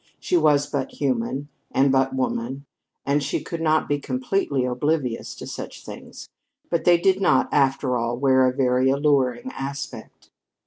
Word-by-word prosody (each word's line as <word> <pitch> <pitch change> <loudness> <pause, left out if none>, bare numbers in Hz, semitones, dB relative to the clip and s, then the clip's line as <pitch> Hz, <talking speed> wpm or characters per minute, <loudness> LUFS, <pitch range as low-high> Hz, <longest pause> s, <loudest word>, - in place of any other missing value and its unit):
She - - -1
was 150 -3 +4
but 140 -2 -3
human 135 +1 -2 0.2
and 135 +1 +3
but 135 0 +2
woman 130 +1 -2 0.4
and 145 +1 +1
she 145 - -1
could 165 -1 -6
not 155 -1 +2
be 145 0 0
completely 195 - -1
oblivious 125 0 -1
to - - -9
such - - -8
things. - - -10 0.4
But 170 -2 0
they 175 -1 +6
did 190 +2 +2
not, - - +3
after 135 -2 +2
all, 120 0 -1
wear 130 -1 +4
a - - +2
very 130 0 +2
alluring 140 - +1
aspect. 140 +1 -7
140 Hz, 160 wpm, -23 LUFS, 130-150 Hz, 0.4 s, they